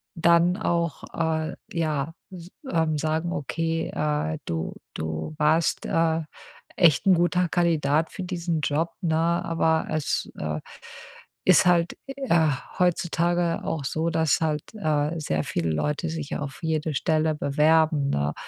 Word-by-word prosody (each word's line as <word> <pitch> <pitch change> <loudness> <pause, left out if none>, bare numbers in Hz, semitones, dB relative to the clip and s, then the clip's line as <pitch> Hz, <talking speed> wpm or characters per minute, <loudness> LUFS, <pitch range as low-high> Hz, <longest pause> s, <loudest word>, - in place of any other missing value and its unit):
dann 170 +1 +4
auch, 170 -7 -1
äh, 160 0 -1 0.2
ja, 155 -2 -1 0.2
s 175 -1 -10 0.2
ähm, 160 -2 +1
sagen: 160 +3 -1
Okay, 165 +2 -2
äh, 150 +1 -1
du, 80 -1 -3 0.2
du 80 - -4
warst, 155 +2 +2
äh, 165 0 +2 0.6
echt 170 +1 +4
'n 190 - +7
guter 175 +1 +2
Kandidat 160 -3 +1
für 190 - -6
diesen 170 -3 -2
Job, 155 +4 0
ne, 165 -4 +1
aber 165 -1 +1
es, 155 -2 -1
äh, 75 0 -3 0.9
ist 185 0 +6
halt, 175 -1 +3
äh, 265 - +1 0.3
heutzutage 175 -1 +1
auch 160 -3 -2
so, 160 +4 -1
dass 160 -1 +2
halt, 155 -2 0
äh, 155 -3 0
sehr 80 - -1
viele 85 +1 -1
Leute 150 - -1
sich 155 -2 -4
auf 140 -2 -6
jede 160 -1 -1
Stelle 155 +2 +1
bewerben, 150 0 +2
ne?“ 70 +1 0
160 Hz, 135 wpm, -25 LUFS, 150-170 Hz, 0.9 s, n